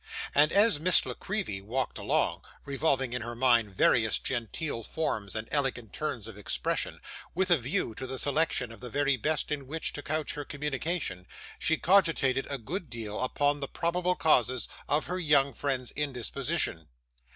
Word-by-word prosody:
And 150 +2 +5
as 205 -6 +4
Miss 180 +3 +4
La - - -3
Creevy 190 - -3
walked 125 +6 -2
along, - - +1 0.2
revolving 135 -3 0
in 125 - -2
her 120 +1 -5
mind 115 -5 +3
various 110 +2 +4
genteel 120 +2 -3
forms 110 -7 -2
and 110 0 -3
elegant 130 -6 -1
turns 125 -8 -3
of 110 -2 -10
expression, 105 - -1 0.4
with 185 +1 +1
a 170 - +7
view 120 -2 -1
to 130 +4 -6
the 130 +1 -4
selection 140 -3 0
of 115 - -11
the 125 - -7
very 140 +2 +2
best 150 +5 -1
in 140 -3 -3
which 160 +3 -2
to 145 - -5
couch 155 +1 -2
her 145 - -4
communication, 145 - -3 0.3
she 160 - +2
cogitated 165 -8 +3
a 140 - -1
good 160 - -5
deal 110 -3 -5
upon 145 +3 +1
the 140 - -3
probable 180 +3 0
causes 130 -6 +2 0.2
of 150 +2 +2
her 180 +1 -2
young 145 -5 +3
friend's 130 -1 -2
indisposition. 135 - -2
140 Hz, 170 wpm, -29 LUFS, 120-155 Hz, 0.4 s, a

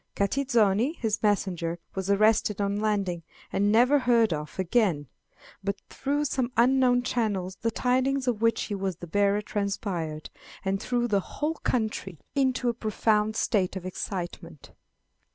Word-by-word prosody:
Catizoni, 230 +1 +2
his 220 -2 -1
messenger, 180 -5 0 0.2
was 190 0 -4
arrested 210 0 +3
on 200 0 0
landing, 200 -5 0 0.3
and 205 +1 +2
never 250 +6 +5
heard 235 -6 +3
of 150 +3 -6
again; 190 -5 +1 0.6
but 200 0 -1
through 290 +2 -1
some 260 -3 -1
unknown 250 0 +4
channels 205 -7 -1
the 230 - -1
tidings 260 +3 0
of 230 -3 0
which 230 -1 +2
he 210 - -4
was 195 -2 -2
the 175 - -9
bearer 205 +4 +1
transpired, 190 -7 -3 0.3
and 195 +1 0
threw 240 0 0
the 205 -3 +2
whole 300 - -3
country 220 - -2 0.2
into 260 -2 +1
a 240 - +2
profound 215 -1 +1
state 195 -5 +1
of 185 -1 -6
excitement. 175 -4 -6
210 Hz, 145 wpm, -27 LUFS, 190-245 Hz, 0.6 s, never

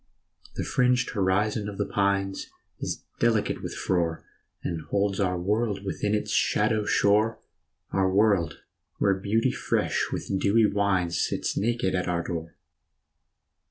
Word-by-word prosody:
The - - -2
fringed 125 0 +2
horizon 105 +2 0
of 100 - -8
the 100 - 0
pines 100 -1 0 0.3
Is - - -4 0.2
delicate 115 -3 +1
with - - -5
frore, 85 -3 -1 0.4
And 85 -2 -3
holds 100 0 0
our 90 -2 +1
world 105 +1 0
within 105 +2 -1
its 105 - -2
shadow 105 0 +2
shore, 105 +2 +3 0.5
Our 95 -1 +2
world 100 -4 +2 0.4
where 100 - +3
beauty 100 +4 +1
fresh - - 0
with 95 - -2
dewy 110 +3 +4
wines 95 -5 +1
Sits - - -1
naked 115 -3 0
at 90 -1 -1
our 85 -1 0
door. 85 -1 -5
100 Hz, 135 wpm, -26 LUFS, 95-105 Hz, 0.5 s, dewy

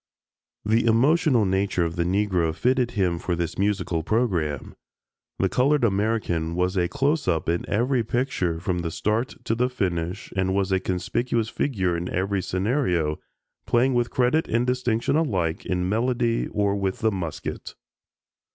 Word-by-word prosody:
The 115 +2 +2
emotional 130 - +4
nature 95 -2 +1
of 85 0 -3
the 85 - +1
Negro 90 -4 +1
fitted 125 +2 +1
him 90 -4 +1
for 90 - -1
this 85 0 -3
musical 100 -4 0
program. 85 - -1 0.6
The - - +2
colored 140 +2 +2
American 100 -6 0
was 90 +2 0
a 90 -2 +2
"close 145 - 0
up" 80 -3 0
in 85 +1 -1
every 120 +3 +1
picture 110 -9 -1
from 90 -1 -1
the 85 -1 -2
start 110 +9 -1
to - - 0
the 125 +2 +1
finish 90 -4 -3
and 95 0 0
was 100 -1 0
a 95 - +3
conspicuous 110 +5 -1
figure 95 -13 -1
in 85 +1 -3
every 95 +1 -1
scenario, 90 - 0 0.5
playing 125 +3 +3
with 120 -1 +1
credit 130 +6 +1
and 120 +2 +1
distinction 125 0 0
alike 95 - 0
in 90 0 0
melody 115 +2 0
or 100 -1 0
with 95 -1 -2
the 110 -1 +3
musket. 90 -5 -5
100 Hz, 155 wpm, -24 LUFS, 90-120 Hz, 0.6 s, emotional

